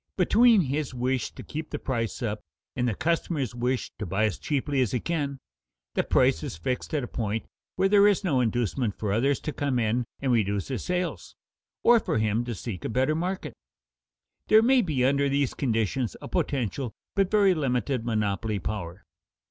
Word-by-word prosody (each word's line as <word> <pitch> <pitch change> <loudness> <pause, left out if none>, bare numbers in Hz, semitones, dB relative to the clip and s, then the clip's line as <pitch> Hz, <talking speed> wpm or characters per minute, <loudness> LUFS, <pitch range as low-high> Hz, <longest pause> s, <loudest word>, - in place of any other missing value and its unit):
Between 225 +3 +5
his 140 -2 -2
wish 125 0 0
to - - -8
keep 155 +1 -6
the 150 - -3
price 120 -4 -3
up, 105 -2 -2 0.4
and 125 - 0
the 115 - 0
customer's 160 - -1
wish 125 +1 -1
to 105 - -3
buy 95 +5 +1
as 105 -5 -2
cheaply 140 -1 0
as 125 - 0
he 125 - +1
can, 145 -4 -2 0.6
the - - +1
price 80 - +3
is - - -5
fixed 125 - -3
at 145 - 0
a - - -4
point 110 -2 -3 0.3
where 190 +1 +3
there 200 0 +6
is 205 -1 +2
no 145 -9 +2
inducement 120 -1 -1
for 105 -2 -1
others 135 +5 +2
to 150 - -4
come 140 -3 -1
in 120 +1 +1
and 135 -2 0
reduce 100 -3 +1
his 130 - -3
sales, 180 -1 -3 0.5
or 235 0 +7
for 160 - -1
him 110 +1 +1
to 120 -2 -4
seek 95 -3 -6
a - - -2
better 130 +6 +1
market. 180 +4 -3 0.9
There 220 +1 +6
may 260 +1 +5
be 150 - 0
under 140 +1 +2
these 140 -1 +1
conditions 115 -1 -1
a - - -8
potential 135 - -2 0.2
but 195 -2 +2
very 200 -3 +4
limited 130 -4 -1
monopoly 110 -2 -1
power. 95 -2 -5
130 Hz, 190 wpm, -27 LUFS, 110-155 Hz, 0.9 s, or